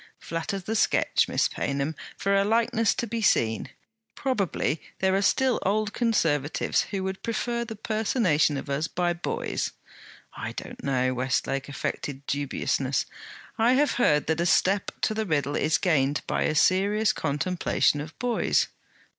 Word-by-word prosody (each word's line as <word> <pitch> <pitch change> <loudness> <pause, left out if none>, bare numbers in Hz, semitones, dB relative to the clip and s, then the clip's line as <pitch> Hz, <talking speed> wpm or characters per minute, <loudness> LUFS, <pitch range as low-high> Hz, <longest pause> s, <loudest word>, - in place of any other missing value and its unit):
Flatter 165 +4 -4
the 195 +4 -4
sketch, - - +2
Miss - - +2
Paynham, 140 +2 -2 0.2
for 200 0 +1
a 195 - +4
likeness 230 +1 +2
to 235 - -1
be 230 0 -3
seen. 110 - +2 0.5
Probably 200 - -1 0.2
there 190 0 +1
are 195 - +2
still 255 +5 +2
Old 210 +2 0
Conservatives 160 - +1
who 195 -2 -3
would 190 0 -4
prefer 235 +1 -2
the 225 -1 -7
personation 205 - +1
of 135 - -6
us 140 +3 -1
by 175 -1 0
boys.' 170 - -3 0.6
'I - - -5
don't - - -8
know,' 130 -2 +1
Westlake 130 +2 -1
affected 140 0 -4
dubiousness. 140 -1 -1 0.5
'I 235 +3 +4
have 285 +3 +3
heard 150 -9 +3
that 160 +1 0
a 175 - +1
step 195 +3 +2
to - - +1
the 220 -1 -2
riddle 145 -3 0
is 155 +1 +2
gained 145 -6 +1
by - - 0
a 155 - 0
serious 200 +6 +3
contemplation 150 0 0
of 155 +1 -9
boys.' 245 -1 +1
180 Hz, 155 wpm, -26 LUFS, 145-215 Hz, 0.6 s, a